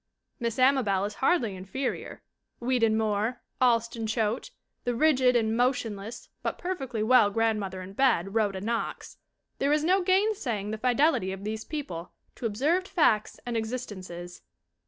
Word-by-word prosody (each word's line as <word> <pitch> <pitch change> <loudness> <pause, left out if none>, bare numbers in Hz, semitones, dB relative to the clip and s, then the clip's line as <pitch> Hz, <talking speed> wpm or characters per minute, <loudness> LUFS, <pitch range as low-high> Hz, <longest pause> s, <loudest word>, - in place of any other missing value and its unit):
Miss 235 -2 -2
Amabel 255 -8 +3
is 205 - -4
hardly 255 - +2
inferior. 220 +9 -4 0.4
Weedon 235 -3 +2
Moore, 220 +2 -1 0.2
Alston 230 -2 +2
Choate, 220 - -1 0.3
the 245 -1 -1
rigid 260 -2 +4
and 225 -1 +2
motionless 230 -4 -1
but - - -2
perfectly 270 -12 -3
well 225 -2 +6
grandmother 205 -4 -1
in 190 +1 -10
bed, 200 -6 +2
Rhoda 205 -4 +1
Knox 230 +3 -3 0.4
there 280 +1 +2
is 300 0 +2
no 370 +4 +3
gainsaying 370 - +1
the 220 - -4
fidelity 250 - +2
of 195 +1 -7
these 215 +1 -3
people 185 - -6 0.2
to 235 - -3
observed 305 - +1
facts 225 - +2
and 240 -1 -3
existences. 195 -7 -5
230 Hz, 140 wpm, -28 LUFS, 210-260 Hz, 0.4 s, well